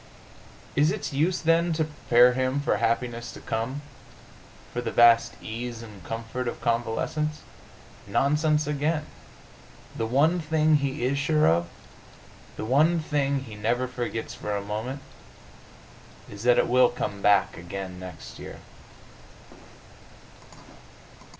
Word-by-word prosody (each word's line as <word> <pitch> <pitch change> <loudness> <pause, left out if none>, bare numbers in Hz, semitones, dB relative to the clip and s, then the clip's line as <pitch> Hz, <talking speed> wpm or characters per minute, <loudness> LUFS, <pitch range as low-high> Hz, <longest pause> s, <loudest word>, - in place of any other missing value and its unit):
Is 150 +2 +4
its 200 -7 -4
use, 165 +6 +1
then, 165 +1 +3
to 160 0 +1
prepare 125 -4 +4
him 130 +2 0
for 130 -7 +1
happiness 115 +1 -1
to - - -10
come 130 +6 -3 0.9
for 120 - -2
the - - -3
vast 115 0 +5
ease 115 +1 -5
and 105 -5 -12
comfort 115 +4 -4
of - - -4
convalescence? 120 +6 -1 0.7
Nonsense 150 +2 +2
again! 150 +2 -1 0.9
The 115 - -2
one 150 +9 +3
thing 155 -1 +3
he 140 -2 -2
is 140 +2 0
sure 150 +1 +3
of, 85 +1 +2 0.9
the - - -4
one 155 +8 +3
thing 140 -3 0
he 115 - -10
never 115 +5 0
forgets 120 -2 -4
for 105 0 -4
a - - -1
moment, 110 +7 -4 1.3
is 100 0 -9
that 125 -1 +5
it - - +3
will 125 0 +5
come 100 -4 -4
back 100 -3 +3
again 90 +1 -7
next 90 -4 -10
year. - - -8
125 Hz, 130 wpm, -26 LUFS, 115-150 Hz, 1.3 s, vast